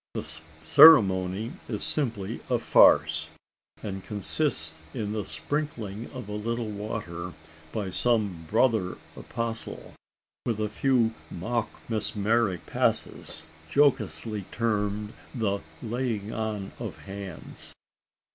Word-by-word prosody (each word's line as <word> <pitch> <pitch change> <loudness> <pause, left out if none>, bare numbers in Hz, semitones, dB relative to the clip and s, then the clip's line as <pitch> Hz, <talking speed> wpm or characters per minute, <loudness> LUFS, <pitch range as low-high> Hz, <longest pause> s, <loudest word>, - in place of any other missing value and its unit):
The - - -3 0.4
ceremony 100 - +6 0.2
is 105 -4 +3
simply 125 -11 0
a - - +3
farce; 80 +2 +4 0.5
and 95 -2 -5
consists 100 - +1
in 105 -2 -3
the 105 -2 -3
sprinkling 120 -8 -4
of 125 -6 -8
a - - -7
little 110 +1 -3
water 95 -5 -5 0.4
by 100 -1 -3
some 100 -7 0
brother 110 -5 +2 0.2
apostle, 115 -1 -5 0.5
with 115 -3 -2
a 105 0 -1
few 120 0 +2 0.2
mock 115 +6 -2 0.2
mesmeric 105 -3 +1
passes - - +1 0.3
jocosely 115 -7 +2
termed 105 -2 -1 0.2
the 100 -4 0 0.2
"laying 115 -3 -2
on 110 -3 -3
of - - -6
hands!" 100 -3 -9
105 Hz, 105 wpm, -27 LUFS, 100-115 Hz, 0.5 s, ceremony